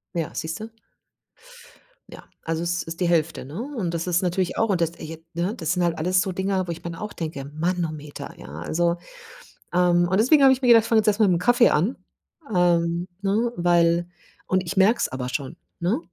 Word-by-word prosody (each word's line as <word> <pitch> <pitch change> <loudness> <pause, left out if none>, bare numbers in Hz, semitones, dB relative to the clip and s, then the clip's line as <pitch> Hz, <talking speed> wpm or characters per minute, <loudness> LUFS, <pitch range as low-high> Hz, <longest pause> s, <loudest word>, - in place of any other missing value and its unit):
Ja, 165 -3 -2
siehst 160 +3 -4
du? 220 - -6 1.4
Ja, - - -11 0.2
also, 165 0 -2
es 175 0 -1
ist 165 +2 -8
die 180 - +1
Hälfte, 165 -5 0
ne? 150 +9 -7
Und 225 - -4
das 165 0 -2
ist 180 0 +1
natürlich 180 0 -1
auch 225 - +2
und 185 -4 +1
das 165 - +1
ergibt, 165 -1 -10
ne 180 +6 -1
das 165 -5 -1
sind 180 - 0
halt 170 -2 0
alles 180 +3 +2
so 190 - -2
Dinger, 190 0 -1
wo - - -2
ich 170 - -8
mir 170 - -4
dann 165 - -9
auch 210 0 -6
denke: 155 -5 -5
„Manometer”, 155 -2 -3
ja, 65 - -11
also, 170 - 0 0.8
ähm, 175 -1 +3
und 190 +3 +1
deswegen 275 +5 +5
habe 265 -1 +8
ich 260 - -4
mir 250 - +1
gedacht, 230 -2 +7
ich - - -6
fange 225 -1 +4
jetzt 215 - -1
erst 210 0 +2
mal 215 - +5
mit'm 175 -2 +2
Kaffee 240 +5 +4
an, 190 - +1 0.5
hm, 175 -2 +1 0.2
ne, 215 +4 +1
weil 170 0 +2 0.4
und 185 0 +1
ich 185 +2 -5
merke 210 +5 +4
es - - +1
aber 125 -1 -4
schon, 140 +4 -4 0.2
ne? 185 - 0
175 Hz, 220 wpm, -24 LUFS, 165-195 Hz, 1.4 s, habe